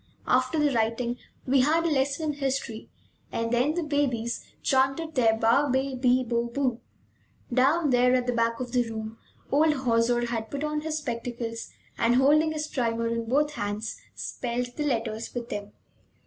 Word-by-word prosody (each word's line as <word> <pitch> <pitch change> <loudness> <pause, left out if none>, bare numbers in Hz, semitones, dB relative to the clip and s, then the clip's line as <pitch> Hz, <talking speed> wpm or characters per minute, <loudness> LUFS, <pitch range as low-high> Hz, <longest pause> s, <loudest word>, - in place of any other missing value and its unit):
After 255 +5 +2
the 295 -2 +2
writing, 235 +2 0 0.3
we 270 +1 +3
had 320 +5 +2
a - - +3
lesson 285 +2 +1
in 285 - -13
history, 265 -5 -2 0.4
and 230 0 -2
then 250 +6 +2
the 350 - 0
babies 265 -6 -1 0.2
chanted 270 +4 +1
their 225 -5 +3
ba, 235 +6 +3
be, 265 +1 0
bi, 255 0 +2
bo, 235 0 0
bu. 250 -1 -1 0.7
Down 285 +4 +3
there 250 0 +4
at 250 -1 +1
the 245 - 0
back 230 0 +1
of 250 -1 -4
the 245 -2 +1
room 220 0 -6 0.3
old 305 +2 +4
Hauser 240 +1 +2
had 225 -2 -3
put 285 +3 -4
on 300 0 -1
his 310 0 -2
spectacles 235 -4 -4 0.3
and, 235 +1 +3
holding 300 +4 +4
his 305 -1 -2
primer 230 -5 -1
in 230 -1 -2
both 295 +3 +2
hands, 205 -3 -3 0.2
spelled 245 0 -3
the 300 - -2
letters 225 -3 -2
with 240 -1 -4
them. 205 0 -5
250 Hz, 175 wpm, -27 LUFS, 230-285 Hz, 0.7 s, there